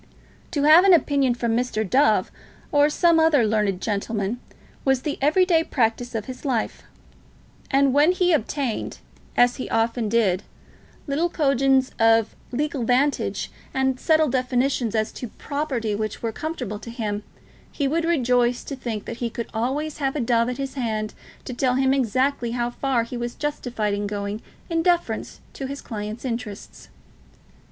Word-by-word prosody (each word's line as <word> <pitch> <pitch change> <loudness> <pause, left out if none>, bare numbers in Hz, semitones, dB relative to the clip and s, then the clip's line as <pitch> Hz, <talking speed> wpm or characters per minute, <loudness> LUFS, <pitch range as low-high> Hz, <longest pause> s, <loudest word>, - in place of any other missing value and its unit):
To 290 -5 -1
have 310 +4 +8
an 385 -2 +7
opinion 275 -5 +2
from 235 -1 0
Mr. 230 -3 -1
Dove, 275 +9 +3 0.4
or 290 0 +4
some 335 +1 +3
other 310 -7 +4
learned 210 -3 +1
gentleman, 210 +1 -2 0.4
was 265 -2 +2
the 295 - -3
every 315 +7 +4
day 330 -3 +3
practice 240 -3 -1
of 215 - -2
his 255 -1 -8
life; 250 -6 -1 0.9
and 275 -1 +3
when 295 +5 +5
he 360 -1 +2
obtained, 270 -3 -1 0.4
as 245 0 +4
he 255 - -5
often 225 0 0
did, 205 -5 +2 0.6
little 315 +4 0
coigns 270 -4 +2
of 225 -1 +4 0.2
legal 280 0 -1
vantage 260 +5 +1 0.2
and 265 -1 +1
subtle 315 -1 +3
definitions 255 -2 0
as 215 0 0
to 245 - -6
property 260 -3 -3
which 215 +2 -4
were 230 - 0
comfortable 250 -7 -5
to 230 - -9
him, 215 -3 -3 0.5
he 280 - -1
would 325 +4 0
rejoice 250 -6 +2
to 280 - -6
think 230 -5 -5
that 230 - -6
he 240 -1 -2
could 235 0 -5
always 280 +7 -2
have 270 -1 -1
a - - -1
Dove 235 -1 +2
at 250 - -4
his 275 -1 -4
hand 220 -5 -2 0.3
to 255 - -5
tell 250 +1 +1
him 265 0 +3
exactly 255 -1 0
how 240 0 -1
far 255 -2 0
he 235 +2 -6
was 240 0 -4
justified 245 -8 -2
in 205 0 -2
going 205 +1 -4 0.3
in 330 -1 0
defence 345 0 0 0.2
of 270 -1 -4
his 280 0 -5
clients' 215 +2 -6
interests. 230 -5 -6
250 Hz, 165 wpm, -23 LUFS, 225-285 Hz, 0.9 s, have